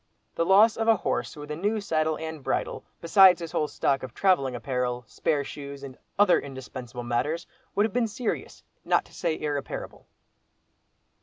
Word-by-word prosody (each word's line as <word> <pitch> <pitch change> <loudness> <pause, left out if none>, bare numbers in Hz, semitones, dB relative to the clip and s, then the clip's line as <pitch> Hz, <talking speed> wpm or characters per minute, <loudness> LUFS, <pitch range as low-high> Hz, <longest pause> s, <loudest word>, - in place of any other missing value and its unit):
The 165 - 0
loss 210 +3 +6
of 225 0 -1
a 225 - +6
horse 190 - -2
with 150 0 -8
a - - -2
new 205 +7 0
saddle 160 -5 0
and 160 -2 -6
bridle, - - -2 0.2
besides 185 +2 +7
his 165 -2 -6
whole 150 - 0
stock 135 -2 0
of 130 -2 -8
travelling 140 -10 +2
apparel, 125 0 -2
spare 145 +5 -1
shoes, 140 0 -8
and 135 -2 -8 0.2
other 205 -2 +5
indispensable 130 -3 -8
matters, 130 +8 -1 0.3
would 205 - +4
have 220 - -3
been 240 -1 +2
serious, 220 +2 -4 0.2
not - - +2
to - - -20
say 165 -3 -2
irreparable. 145 -2 -4
155 Hz, 170 wpm, -27 LUFS, 135-190 Hz, 0.3 s, besides